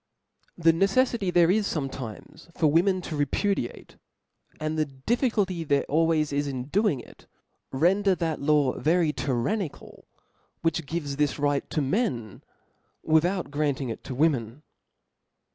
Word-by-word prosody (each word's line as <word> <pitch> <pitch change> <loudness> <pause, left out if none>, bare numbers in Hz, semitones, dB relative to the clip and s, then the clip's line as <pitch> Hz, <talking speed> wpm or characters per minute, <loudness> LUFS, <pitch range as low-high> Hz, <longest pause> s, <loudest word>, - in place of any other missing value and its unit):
The 165 -1 +4
neceffity 200 +2 +2
there 175 0 +5
is 210 +1 +1
fometimes 135 0 -6
for 160 - +2
women 180 +5 +3
to 165 - -5
repudiate, 145 - -2 0.6
and 155 0 -2
the 155 -1 +1
difficulty 190 - -1
there 140 -2 +1
always 155 -1 +1
is 145 0 0
in 130 -1 -5
doing 200 - +1
it, - - -17 0.4
render 190 +7 +3
that 165 -4 -2
law 145 -2 +2
very 165 -1 +2
tyrannical, 140 - -3 0.6
which 165 -2 0
givei 145 -4 -3
this 150 -1 +1
right 145 -1 0
to 155 - -1
men, 135 - -2 0.6
without 170 +2 +1
grafting 145 -3 -1
it 115 - -6
to 130 - -5
Women. 135 -3 0
155 Hz, 130 wpm, -26 LUFS, 140-180 Hz, 0.6 s, there